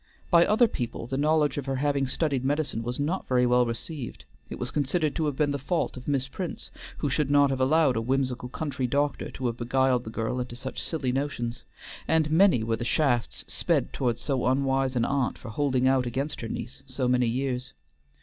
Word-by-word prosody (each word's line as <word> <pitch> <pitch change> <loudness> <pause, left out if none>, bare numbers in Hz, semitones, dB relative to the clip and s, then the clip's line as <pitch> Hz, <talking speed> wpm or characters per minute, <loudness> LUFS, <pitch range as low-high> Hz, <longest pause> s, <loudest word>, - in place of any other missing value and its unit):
By 170 -1 +6
other 220 +3 +5
people 120 - -4
the 130 +3 -4
knowledge 150 +1 +2
of 140 - -7
her 135 - 0
having 140 0 +1
studied 140 -1 0
medicine 140 -4 0
was 120 +3 -4
not 160 +7 -1
very 125 -1 +3
well 125 0 +4
received. 120 +3 -6 0.2
It - - -6
was - - -4
considered 150 +2 0
to 160 - 0
have 145 - -1
been 145 0 +1
the 140 - -2
fault 165 +6 -1
of 125 - -10
Miss 135 -2 0
Prince, 175 +5 -6 0.3
who 150 - -1
should 150 0 +1
not 145 -1 +5
have 130 -1 -1
allowed 140 0 +4
a 115 - 0
whimsical 125 0 -1
country 135 -2 -2
doctor 145 +3 0
to 130 - -6
have 120 -1 -1
beguiled 125 +1 +2
the 110 - -7
girl 115 +3 -2
into 125 -1 -4
such 130 +2 -6
silly 140 -6 -1
notions, 125 -3 -3 0.4
and 155 -2 +2
many 165 - +5
were 115 0 0
the 120 - -4
shafts 125 -2 0
sped - - 0
toward 120 -3 0
so 135 -4 -1
unwise 135 0 +1
an 120 -1 +2
aunt 140 -3 0
for 120 - -9
holding 130 +1 +1
out 130 -2 +3
against 135 +5 -3
her 115 - -5
niece 125 - -6
so 130 -1 -1
many 125 -1 +3
years. 125 +1 -2
135 Hz, 210 wpm, -27 LUFS, 125-145 Hz, 0.4 s, By